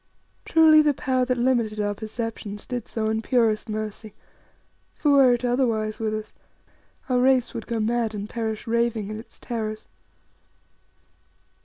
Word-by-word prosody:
Truly, 315 Hz, -1 st, +6 dB
the 295 Hz, -2 st, +2 dB
Power 255 Hz, -1 st, 0 dB
that 250 Hz, 0 st, 0 dB
limited 240 Hz, -4 st, +1 dB
our 205 Hz, 0 st, 0 dB
perceptions 220 Hz, -1 st, -6 dB
did 245 Hz, -3 st, -5 dB
so 220 Hz, -1 st, -2 dB
in 220 Hz, 0 st, 0 dB
purest 225 Hz, -2 st, +1 dB
mercy, 215 Hz, 0 st, -5 dB, 0.8 s
for 295 Hz, -, +1 dB
were 270 Hz, -3 st, +6 dB
it 245 Hz, +1 st, -1 dB
otherwise 230 Hz, -4 st, 0 dB
with 215 Hz, -1 st, -1 dB
us, 215 Hz, 0 st, -7 dB, 0.7 s
our 250 Hz, -2 st, +2 dB
race 255 Hz, -1 st, +3 dB
would 230 Hz, -3 st, -6 dB
go 230 Hz, -2 st, -2 dB
mad 225 Hz, 0 st, 0 dB
and 205 Hz, 0 st, -5 dB
perish 220 Hz, -1 st, -4 dB
raving 230 Hz, -2 st, 0 dB
in 215 Hz, -, -5 dB
its 225 Hz, -, -14 dB
terrors. 215 Hz, -3 st, -5 dB
230 Hz, 150 wpm, -24 LUFS, 215-250 Hz, 0.8 s, Truly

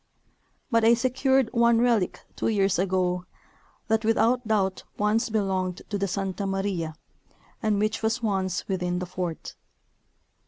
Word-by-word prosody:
But 230 Hz, -1 st, +3 dB
I 230 Hz, +1 st, +6 dB
secured 265 Hz, 0 st, +2 dB
one 235 Hz, 0 st, +4 dB
relic 230 Hz, -6 st, +1 dB
two -, -, -1 dB
years 195 Hz, -4 st, +2 dB
ago 180 Hz, -1 st, 0 dB, 0.6 s
that 220 Hz, 0 st, +1 dB
without 225 Hz, +2 st, +2 dB
doubt 195 Hz, -4 st, 0 dB
once 215 Hz, +3 st, +1 dB
belonged 190 Hz, -4 st, -1 dB
to 205 Hz, -, 0 dB
the 200 Hz, -, 0 dB
Santa 195 Hz, +1 st, -2 dB
Maria 195 Hz, -5 st, -2 dB, 0.7 s
and 215 Hz, -2 st, +1 dB
which 215 Hz, +2 st, 0 dB
was 225 Hz, +2 st, 0 dB
once 190 Hz, -4 st, -1 dB
within 180 Hz, -2 st, -1 dB
the 180 Hz, -, -3 dB
fort. 180 Hz, -2 st, -5 dB
205 Hz, 135 wpm, -26 LUFS, 185-225 Hz, 0.7 s, I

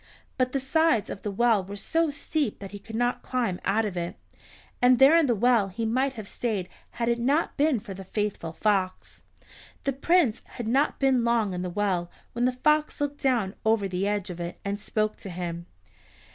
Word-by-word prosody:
But 255 Hz, -1 st, +1 dB
the 275 Hz, -, 0 dB
sides 270 Hz, -4 st, +2 dB
of -, -, -7 dB
the 210 Hz, -, -3 dB
well 220 Hz, 0 st, +2 dB
were 200 Hz, +2 st, -8 dB
so 325 Hz, +10 st, 0 dB
steep 290 Hz, -3 st, -2 dB
that 195 Hz, -1 st, -9 dB
he 205 Hz, -, -8 dB
could 220 Hz, +2 st, -9 dB
not 245 Hz, +2 st, 0 dB
climb 235 Hz, -8 st, -1 dB
out 215 Hz, +3 st, +1 dB
of 200 Hz, -3 st, -4 dB
it, 170 Hz, 0 st, -3 dB, 0.7 s
and 250 Hz, 0 st, +6 dB
there 270 Hz, +5 st, +7 dB
in 330 Hz, -3 st, +4 dB
the 240 Hz, -, +2 dB
well 235 Hz, -1 st, +3 dB
he 225 Hz, +4 st, -4 dB
might 260 Hz, +4 st, +1 dB
have 215 Hz, -5 st, -8 dB
stayed 205 Hz, -5 st, -2 dB, 0.2 s
had 235 Hz, -, -2 dB
it 235 Hz, 0 st, +1 dB
not 280 Hz, +7 st, +1 dB
been 290 Hz, -4 st, +2 dB
for 200 Hz, -2 st, -8 dB
the 190 Hz, +1 st, -8 dB
faithful 200 Hz, -4 st, -3 dB
fox. 190 Hz, 0 st, -1 dB, 0.6 s
The 275 Hz, -, 0 dB
Prince 280 Hz, -3 st, +2 dB, 0.2 s
had 240 Hz, -, -4 dB
not 270 Hz, +6 st, +2 dB
been 265 Hz, -3 st, +3 dB
long 230 Hz, -4 st, +1 dB
in 180 Hz, -, -3 dB
the 180 Hz, -, -3 dB
well 180 Hz, -2 st, -1 dB, 0.2 s
when 240 Hz, +1 st, 0 dB
the 255 Hz, -, +3 dB
fox 300 Hz, +4 st, +1 dB
looked 290 Hz, 0 st, -2 dB
down 235 Hz, -8 st, +1 dB
over 220 Hz, -2 st, +2 dB
the 190 Hz, +1 st, -1 dB
edge 205 Hz, -3 st, -1 dB
of 175 Hz, -, -8 dB
it 170 Hz, 0 st, -5 dB
and 200 Hz, +1 st, -2 dB
spoke 215 Hz, 0 st, -1 dB
to 195 Hz, -, -8 dB
him. 170 Hz, -1 st, -5 dB
225 Hz, 210 wpm, -26 LUFS, 195-255 Hz, 0.7 s, there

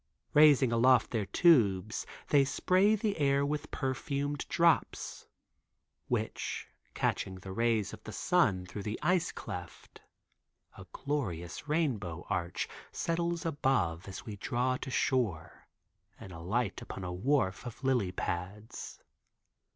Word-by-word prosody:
Raising 145 Hz, -4 st, +6 dB
aloft 125 Hz, +2 st, +4 dB
their 110 Hz, -5 st, -1 dB
tubes 110 Hz, -, +3 dB, 0.2 s
they 145 Hz, -2 st, +6 dB
spray 185 Hz, +10 st, +3 dB
the 210 Hz, -1 st, -1 dB
air 140 Hz, -1 st, +3 dB
with 150 Hz, +1 st, -3 dB
perfumed 140 Hz, +2 st, -2 dB
drops, 170 Hz, -1 st, +1 dB, 0.8 s
which, -, -, -2 dB, 0.3 s
catching 95 Hz, -, -1 dB
the 95 Hz, +1 st, -9 dB
rays 115 Hz, 0 st, +1 dB
of -, -, -10 dB
the -, -, -7 dB
sun 105 Hz, -, +2 dB
through 100 Hz, +3 st, -7 dB
the 105 Hz, +2 st, -3 dB
ice 180 Hz, -2 st, +2 dB
cleft, 90 Hz, -1 st, -8 dB, 0.7 s
a -, -, -11 dB
glorious 110 Hz, -, -3 dB
rainbow 110 Hz, -, -1 dB
arch 85 Hz, +1 st, -1 dB, 0.2 s
settles 170 Hz, 0 st, -1 dB
above 105 Hz, -, 0 dB
as 95 Hz, -, -8 dB
we 105 Hz, -, -6 dB
draw 125 Hz, +5 st, 0 dB
to -, -, -6 dB
shore 120 Hz, -, -1 dB, 0.5 s
and 95 Hz, -, -10 dB
alight 95 Hz, +6 st, -2 dB
upon 95 Hz, -, -7 dB
a 90 Hz, -1 st, -4 dB
wharf 95 Hz, -1 st, +1 dB
of 120 Hz, +3 st, -9 dB
lily 125 Hz, -8 st, +2 dB
pads. 95 Hz, +4 st, -5 dB
120 Hz, 125 wpm, -31 LUFS, 95-145 Hz, 0.8 s, Raising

